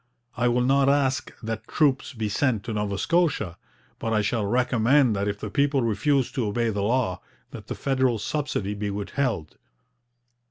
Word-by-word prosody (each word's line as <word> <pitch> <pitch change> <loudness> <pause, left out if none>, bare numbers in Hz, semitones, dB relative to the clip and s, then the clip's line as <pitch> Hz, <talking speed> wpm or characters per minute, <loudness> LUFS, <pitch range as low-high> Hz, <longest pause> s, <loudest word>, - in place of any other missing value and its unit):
I 125 -1 +1
will 120 +1 +2
not 135 +1 +3
ask 135 -3 +1
that 110 -1 -4
troops 140 -4 +1
be 110 -2 -2
sent 110 0 0
to 115 - -4
Nova 105 -1 -2
Scotia, 145 - +1 0.4
but 115 - -2
I 105 -1 +2
shall 105 -1 0
recommend 125 +1 +3
that 100 +1 -1
if 100 0 -2
the 105 - -6
people 140 0 +2
refuse 130 +4 +1
to 120 -5 -1
obey 115 +2 0
the 100 -1 -2
law, 110 -3 0 0.3
that - - -10
the - - -4
federal 130 -3 +1
subsidy 105 -3 -2
be 105 0 -3
withheld.' 100 - -3
120 Hz, 170 wpm, -25 LUFS, 105-135 Hz, 0.4 s, not